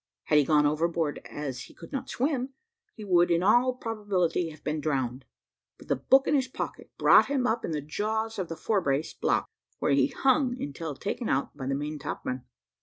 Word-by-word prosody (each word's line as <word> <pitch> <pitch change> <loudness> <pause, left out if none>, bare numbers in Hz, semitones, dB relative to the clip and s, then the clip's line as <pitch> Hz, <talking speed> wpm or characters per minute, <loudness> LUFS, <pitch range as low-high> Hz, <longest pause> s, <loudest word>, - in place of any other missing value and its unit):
Had 150 - +4
he 145 - +3
gone 150 -1 +4
overboard 160 +1 0
as 135 -4 -5
he - - -17
could - - -12
not 270 -1 -4
swim, 265 0 -1 0.4
he 215 - -9
would 175 -2 +4
in 170 +1 +2
all 245 +5 +4
probability 205 -8 -1
have 155 -1 -13
been 150 +1 -2
drowned; 130 -4 -2 0.5
but - - -16
the - - +3
book 270 +1 +4
in - - +1
his 265 -3 +2
pocket 255 - -6
brought - - +6
him 275 -3 0
up 230 -1 0
in - - -3
the 155 -2 -2
jaws 220 +8 -2
of 185 - -3
the 165 - -5
fore 210 -3 +1
brace, 140 -1 -1
block, - - 0 0.3
where - - 0
he 140 - +4
hung 260 -2 +1
until 145 - -5
taken 215 - -3
out 135 - 0
by 135 -3 -6
the 135 - 0
main 150 +2 -4
topmen. 130 -3 -4
170 Hz, 205 wpm, -28 LUFS, 150-235 Hz, 0.5 s, brought